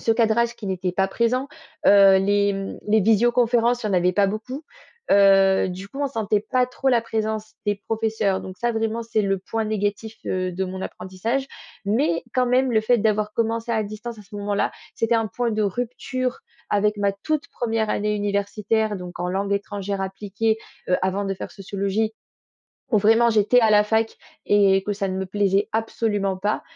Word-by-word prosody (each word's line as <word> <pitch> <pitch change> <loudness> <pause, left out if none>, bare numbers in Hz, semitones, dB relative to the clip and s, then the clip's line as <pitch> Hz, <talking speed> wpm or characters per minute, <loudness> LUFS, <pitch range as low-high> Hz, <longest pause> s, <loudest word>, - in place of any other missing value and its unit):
ce 225 - 0
cadrage 235 +1 +2
qui 205 - -8
n'était 185 -1 -2
pas 190 +1 +1
présent, 250 +6 0 0.4
heu, 195 -1 +7
les, 200 +1 +2
mmh, 195 0 -5
les 220 +1 +4
visioconférences, 235 +3 +3
il - - 0
y - - -2
en - - +1
avait 180 +1 +3
pas 200 -1 +4
beaucoup. 250 +8 -5 0.5
Heu, 195 -1 +5
du 190 +2 -7
coup 275 - -10
on 285 - +1
sentait 215 -4 0
pas 250 +3 +1
trop 265 +2 -2
la 240 -2 +4
présence 220 -1 -3
des 205 - +2
professeurs 220 -3 0
donc 185 0 -9
ça, 240 0 0
vraiment, 225 +1 -1
c'est 225 -2 0
le 195 -1 0
point 225 +3 -3
négatif, 215 +1 -2
heu, 185 -1 -1
de 190 +2 -2
mon 185 0 -6
apprentissage. 225 +11 -3 0.4
Mais, 205 - +1
quand 255 -1 +2
même, 255 +1 +2
le 220 - +4
fait 240 +2 +3
d'avoir 215 0 +1
commencé 230 +1 -1
à 220 - +1
distance 215 +2 -7
à - - -11
ce 205 +1 -11
moment-là, 205 0 -1 0.2
c'était 230 0 +1
un 225 -1 0
point 240 +4 -1
de 215 -1 0
rupture 245 +4 -2 0.3
avec 210 +1 +2
ma 200 0 +2
toute 305 +11 -3
1re 225 -2 -1
année 210 0 0
universitaire, 205 +1 0
donc 180 -1 -8
en 180 - -1
langues 195 +2 -1
étrangères 200 -1 -3
appliquées, 210 +3 -1 0.3
heu, 180 - +3
avant 190 +2 0
de 195 0 -2
faire - - -7
sociologie, 200 +2 -2 0.8
où 215 - +5
vraiment 225 +3 +4
j'étais 220 +3 +4
à 220 - +4
la 210 0 +6
fac 220 +1 0 0.3
et 195 -2 +4
que 210 - -1
ça 195 -1 -2
ne 185 - -3
me 190 - -2
plaisait 200 +1 +1
absolument 210 -3 -1
pas. 205 +3 -1
210 Hz, 195 wpm, -23 LUFS, 195-225 Hz, 0.8 s, heu